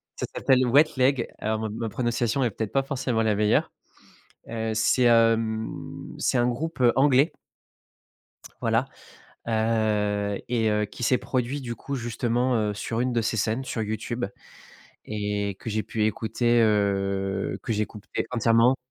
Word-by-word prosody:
Ça - - -3
s'appelle 130 -1 +3
Wet 145 +5 +4
Leg 130 -1 +2
alors 110 0 -1
ma 110 - -2
ma 115 +1 -4
prononciation 120 +2 0
est 120 - +2
peut-être 110 +1 -4
pas 135 - +2
forcément 130 -4 -1
la 110 -1 +2
meilleure, 105 +1 +2 0.8
heu, 110 -1 -2
c'est, 125 +3 +3
hem, 115 -1 +1
c'est - - +1
un 120 - +3
groupe, 130 +5 -3
heu, 120 -2 +6
anglais 140 +3 +4 1.3
voilà, - - +1 0.6
heu 105 -2 0
et 115 -2 +1
heu 105 0 +1
qui 105 +4 -9
s'est 125 +2 +3
produit, 130 +2 -2
du 120 -2 -5
coup, 140 - -5
justement, 120 +1 0
heu, 105 -2 0
sur 115 +3 -3
une 125 0 0
de 120 - +2
ces 110 0 -1
scènes, 110 +5 0
sur 115 -3 -3
YouTube 110 +3 -3 0.8
et 105 -2 -2
que 115 - -5
j'ai 110 0 -1
pu 110 -1 -1
écouter, 120 +2 +1
heu, 100 -2 +1
que 115 - -2
j'écoutais 105 -1 -3
entièrement 115 +2 +4
115 Hz, 155 wpm, -25 LUFS, 105-125 Hz, 1.3 s, heu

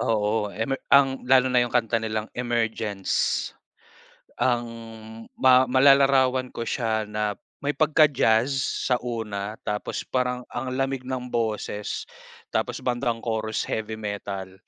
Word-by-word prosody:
oo, 105 -1 +1
emer 110 +6 -3
ang 135 -1 +5
lalo 130 -1 +5
na 125 - +5
'yung 120 - +1
kanta 115 -1 +1
nilang 110 -1 -2
Emergence. 110 -5 -1 0.9
Ang 120 -2 +1 0.8
ma 130 0 +6
malalarawan 130 -1 +4
ko - - -5
siya 110 -2 -1
na 105 0 -1 0.3
may 145 - +1
pagka-jazz 140 -7 +3 0.4
sa 125 - +4
una 110 -3 -4
tapos 105 0 -3
parang 125 -1 -1
ang 130 +1 -4
lamig 135 -1 -1
ng 125 -1 -5
boses, 110 -2 -2 0.5
tapos - - -1
bandang 120 -2 -1
chorus, 110 -1 -2
heavy 110 0 -3
metal, 100 -3 -5
120 Hz, 125 wpm, -25 LUFS, 110-130 Hz, 0.9 s, ma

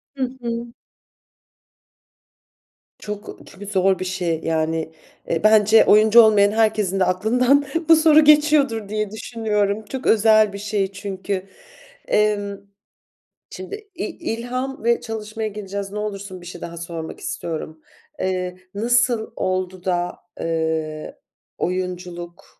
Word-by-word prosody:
Hı 270 - -2 0.2
hı. 235 0 -4 2.3
Çok 210 -1 -7
çünkü 200 +1 -11
zor 190 -1 +2
bir 185 - -3
şey, 175 -3 -2
yani, 160 0 -1 0.4
e, 165 +4 -1
bence 215 0 +6
oyuncu 215 +2 +7
olmayan 205 -2 +5
herkesin 215 -3 +1
de 185 - +4
aklından 250 +10 +2 0.2
bu 325 - +9
soru 315 -1 +6
geçiyordur 295 -8 +4
diye 215 -1 -2
düşünüyorum. 215 -2 -2
Çok 260 +5 -5
özel 215 -1 +5
bir - - -5
şey 200 -1 -2
çünkü. 195 -1 -4 0.6
Emm, 205 -1 +1 0.9
şimdi 415 +2 -9
i 355 - -3 0.3
ilham 255 +2 -4
ve 235 +1 +2
çalışmaya 220 -1 -5
geleceğiz. 200 -1 -6
Ne 210 - -4
olursun 200 -3 -6
bir - - -13
şey 175 0 -9
daha 170 0 -7
sormak 165 -1 -6
istiyorum. 160 -1 -5 0.4
Eee, 185 -1 -2 0.2
nasıl 235 +1 +1
oldu 185 -1 -2
da, 175 -1 -1 0.2
eee, 160 -2 -2 0.4
oyunculuk 180 0 -4
205 Hz, 120 wpm, -21 LUFS, 185-225 Hz, 2.3 s, bu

